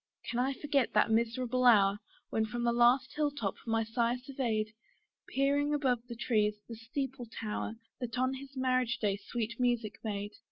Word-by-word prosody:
Can 240 - -1
I 265 +2 +1
forget 280 -2 0
that - - +4
miserable 235 +2 +1
hour, 205 -4 +6 0.3
When 220 - +2
from 240 +2 -3
the 235 - +3
last 240 +3 +4
hill 300 -1 +1
top, 230 -9 -3
my 225 0 +2
sire 235 +2 0
surveyed, 240 -5 -2 0.5
Peering 285 +2 +2
above 250 -5 0
the 235 - -6
trees, 215 -3 +1
the 230 - -7
steeple 245 +2 -4
tower, 220 0 -4 0.2
That 245 -1 -4
on 255 +1 +2
his 270 +1 -9
marriage 255 -2 +1
day 205 -3 +1
sweet 230 +3 -4
music 240 -4 0
made? 205 -2 -3
240 Hz, 170 wpm, -32 LUFS, 225-260 Hz, 0.5 s, hour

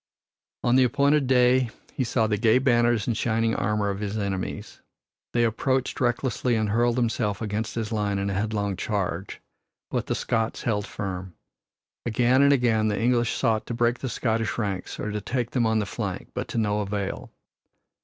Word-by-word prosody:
On 120 0 +3
the 130 - +6
appointed 140 +2 +3
day 125 -1 +4 0.2
he 130 - -1
saw 115 -1 +1
the 105 -1 +1
gay 110 +3 +4
banners 120 -4 +3
and 120 - 0
shining 115 0 +1
armor 105 -1 0
of 100 - -5
his 105 0 -3
enemies. 100 -3 -4 0.5
They 120 - +2
approached 130 +4 0
recklessly 120 0 +1
and 110 -1 0
hurled 120 +2 +2
themselves 115 -4 0
against 110 0 -3
his 115 -1 -3
line 105 -2 0
in 100 0 -1
a - - -2
headlong 100 -1 -1
charge. 95 -4 -3 0.5
But - - -1
the - - 0
Scots 115 0 -1
held 105 -3 -1
firm. 95 -3 -5 0.7
Again 120 +3 +3
and 140 0 +6
again 115 -5 +3
the 105 - 0
English 120 0 +2
sought 110 -4 0
to 120 - -3
break 120 +1 +1
the 130 - -3
Scottish 115 -2 -1
ranks 100 -5 -3
or 105 - -3
to 105 0 -3
take 125 +2 -2
them 120 -3 +2
on 110 0 +2
the 105 - +1
flank, - - -5
but - - -3
to - - -5
no 105 -2 +1
avail. 100 -1 -3
115 Hz, 185 wpm, -25 LUFS, 105-120 Hz, 0.7 s, the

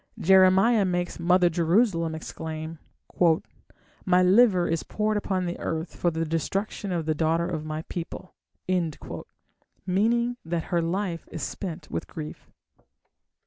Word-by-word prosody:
Jeremiah 190 +4 +5
makes 175 -2 -1
"Mother 180 +1 +4
Jerusalem" 170 0 +2
exclaim: 160 0 -6 1.2
"My 180 -1 +4
liver 185 -2 +5
is 165 -1 0
poured 215 0 -1
upon 190 -3 -1
the 175 0 -4
earth 160 +1 -3
for 175 - +1
the 165 0 -2
destruction 195 +5 -2
of 170 -3 -1
the 155 - +1
daughter 165 +2 +1
of 160 -4 -4
my 155 +1 -4
people", 180 +2 -7 1.5
meaning 235 +6 +1
that 165 0 -2
her 170 - +3
life 175 0 -2
is 160 - -5
spent 170 -5 -5
with - - -3
grief. 155 -1 -8
175 Hz, 130 wpm, -26 LUFS, 165-190 Hz, 1.5 s, Jeremiah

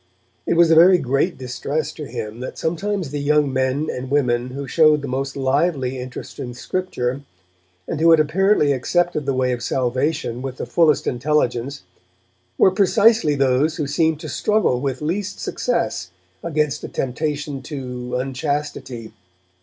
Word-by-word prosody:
It - - +2
was 170 -1 +5
a - - +6
very 180 +3 +7
great 140 +5 0
distress 135 +4 -3
to 150 - -8
him 105 +2 -6
that 130 - -6
sometimes 175 0 -2
the 145 - -3
young 145 -1 +2
men 130 +3 0
and 130 +1 -6
women 125 -4 +1
who 135 +2 -6
showed 155 +1 +4
the - - -3
most 135 +2 -3
lively 135 -1 0
interest 125 0 -8
in 120 -1 -6
Scripture, 135 -6 -3 0.7
and 150 - -3
who 165 - +5
had 165 -1 +7
apparently 155 0 +3
accepted 155 +3 0
the 135 - +1
way 130 0 +1
of 120 -1 -3
salvation 130 0 -1
with 135 -1 -5
the - - -4
fullest 160 -3 +3
intelligence, 135 0 -1 0.7
were 190 - +5
precisely 200 -3 +4
those 135 +3 +2
who 150 - -2
seemed 155 +2 +1
to - - -6
struggle 210 -13 +1
with 135 0 -3
least 190 +6 -2
success 90 - -2 0.3
against 150 -3 -1
a - - -4
temptation 145 +1 -3
to 125 -3 -6
unchastity. 130 -3 -3
140 Hz, 155 wpm, -21 LUFS, 130-160 Hz, 0.7 s, very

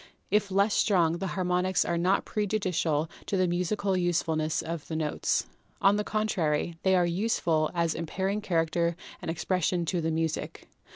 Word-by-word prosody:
If 210 -1 +2
less 200 +2 +2
strong, 170 -4 +2
the 195 - -2
harmonics 180 0 +1
are 170 - 0
not 180 +3 +2
prejudicial 185 -7 0 0.2
to 195 - 0
the 185 -1 +3
musical 185 +3 0
usefulness 165 -3 0
of 165 -2 -5
the 160 - -4
notes. 155 -2 0 0.3
On 195 +1 +5
the 210 - 0
contrary, 175 -7 0
they 190 0 +3
are 180 -1 +4
useful 170 -4 +1
as 170 -2 +1
imparting 190 +5 -2
character 170 -2 0 0.3
and - - -5
expression 175 +1 0
to 175 +1 -1
the 165 - 0
music. 160 0 -3
175 Hz, 160 wpm, -28 LUFS, 165-195 Hz, 0.3 s, On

